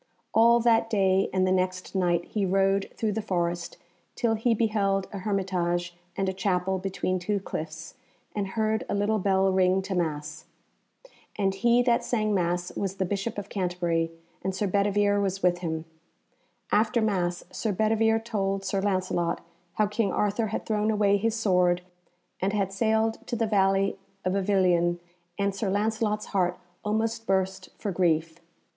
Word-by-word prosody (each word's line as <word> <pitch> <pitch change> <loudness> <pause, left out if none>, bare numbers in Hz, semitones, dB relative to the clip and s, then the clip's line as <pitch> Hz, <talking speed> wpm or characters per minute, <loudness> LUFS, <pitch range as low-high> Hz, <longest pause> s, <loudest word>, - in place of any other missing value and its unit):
All 235 +1 +6
that 225 -1 +3
day 195 -3 +2
and 185 0 +2
the 185 - +1
next 185 0 -1
night 175 -3 +1
he 210 - -2
rode 195 +1 +2
through 220 -2 -1
the 220 +2 -2
forest 175 -4 -2 0.4
till 230 -2 +1
he 225 +1 +2
beheld 200 -3 +1
a 200 - -4
hermitage 180 -3 -1 0.2
and 195 - 0
a 190 - 0
chapel 190 -1 0
between 185 -1 -2
two 200 +3 -1
cliffs, 160 -2 -6 0.4
and 205 -2 -1
heard 220 +2 +1
a - - 0
little 210 +2 +1
bell 190 0 +2
ring 185 0 +3
to 190 +1 -4
Mass. 155 -4 -3 0.9
And 195 -2 +1
he 235 +5 +3
that 240 0 +2
sang 215 -3 0
Mass 175 -1 -1
was 195 -1 -2
the 190 - -1
Bishop 205 +4 -3
of 205 - -5
Canterbury, 175 -3 -1 0.3
and 190 0 -2
Sir 205 - 0
Bedivere 205 +1 +2
was 195 -1 -2
with 175 -1 +3
him. 160 -2 -3 0.9
After 215 +2 +3
Mass 180 -5 0
Sir 220 - -2
Bedivere 225 +2 +2
told 195 -4 -2
Sir 195 0 0
Lancelot 185 -3 0 0.3
how 215 - +2
King 210 -1 0
Arthur 210 +3 0
had 215 - -4
thrown 215 0 0
away 205 -2 +3
his 225 +2 0
sword 180 -5 +2 0.6
and 195 +2 0
had 195 -2 0
sailed 220 +2 +1
to 240 - -2
the 225 0 +1
valley 195 -2 +2 0.3
of 185 - +1
Avilion, 185 -3 +2 0.4
and 200 0 0
Sir 195 +1 -2
Lancelot's 215 +1 0
heart 180 -2 +1 0.3
almost 225 +2 -1
burst 190 0 0
for 205 - -3
grief. 165 -2 +1
195 Hz, 165 wpm, -27 LUFS, 185-215 Hz, 0.9 s, All